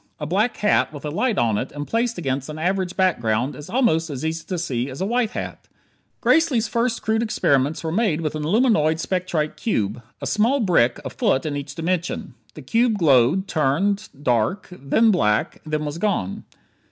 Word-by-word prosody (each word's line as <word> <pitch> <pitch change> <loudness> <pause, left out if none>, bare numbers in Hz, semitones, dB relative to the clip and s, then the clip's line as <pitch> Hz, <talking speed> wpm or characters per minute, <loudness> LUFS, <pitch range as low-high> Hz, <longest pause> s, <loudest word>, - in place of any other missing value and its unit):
A 150 - -3
black 205 +9 0
hat 210 - +2
with 145 -1 -9
a 150 - -3
light 225 +6 0
on 110 -3 +2
it 130 - -4
and 145 0 -5
placed 235 +4 -1
against 135 -4 -2
an 155 - -6
average 185 +2 -1
background 125 - +1
is 150 +4 -10
almost 185 -9 +2
as 140 0 -4
easy 165 +1 -2
to 185 - -3
see 135 -6 -2
as 130 - -8
a 190 - 0
white 235 +1 +1
hat. - - -6 0.5
Gracely's 275 -9 +3
first 235 +2 -1
crude 220 +1 +1
experiments 145 - +1
were 160 - -2
made 185 -4 +1
with 155 -2 -2
an 155 - -4
aluminoid 165 - +3
spectrite 175 -4 -2
cube 115 - -1 0.2
a - - -5
small 230 +7 +2
brick 165 - +2
a - - -4
foot 135 - +1
in 150 -2 -2
each 140 0 -6
dimension. 170 -4 -2 0.2
The 150 - -9
cube 225 - +2
glowed, 155 +3 +3
turned, 190 +8 0
dark, 125 - 0
then 180 - +2
black, 105 - +1
then 155 0 -1
was 150 +3 -4
gone. 175 - -1
165 Hz, 190 wpm, -22 LUFS, 140-210 Hz, 0.5 s, Gracely's